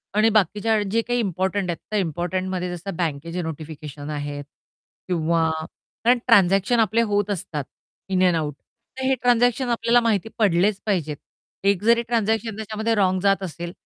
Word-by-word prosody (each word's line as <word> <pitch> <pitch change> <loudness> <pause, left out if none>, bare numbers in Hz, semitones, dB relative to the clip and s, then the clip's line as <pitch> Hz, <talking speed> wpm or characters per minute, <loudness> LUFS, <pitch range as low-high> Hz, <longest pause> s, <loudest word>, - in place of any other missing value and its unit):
आणि 215 +1 +5
बाकीच्या 210 +3 +1
वेळी 205 -2 -1
जे 230 +2 +2
काही 245 +1 -1
इम्पोर्टंट 190 -1 -1
आहेत, 170 - -1
त्या 215 - 0
इम्पोर्टंटमध्ये 180 +2 -2
जसं 175 +2 -6
बँकेचे 165 +1 -2
नोटिफिकेशन 155 -2 -7
आहेत 145 -1 -4 0.6
किंवा 165 -2 +1 0.6
कारण 245 +2 +5
ट्रान्झॅक्शन 195 +1 +4
आपले 225 +1 +3
होत 205 0 +1
असतात 160 -6 -3 0.5
इन 185 -1 +2
अँड 180 -2 +3
आउट. 150 -3 -1 0.5
तर 265 - -3
हे 265 0 +3
ट्रान्झॅक्शन 245 +1 +3
आपल्याला 235 0 +3
माहिती 225 -2 0
पडलेच 200 -1 +2
पाहिजेत. 160 -8 -1 0.5
एक 200 -1 +2
जरी 235 +1 +4
ट्रान्झॅक्शन 225 -1 0
त्याच्यामध्ये 220 +1 -2
रॉंग 190 -2 +2
जात 195 0 +2
असेल 170 -1 -5
195 Hz, 155 wpm, -23 LUFS, 170-225 Hz, 0.6 s, आणि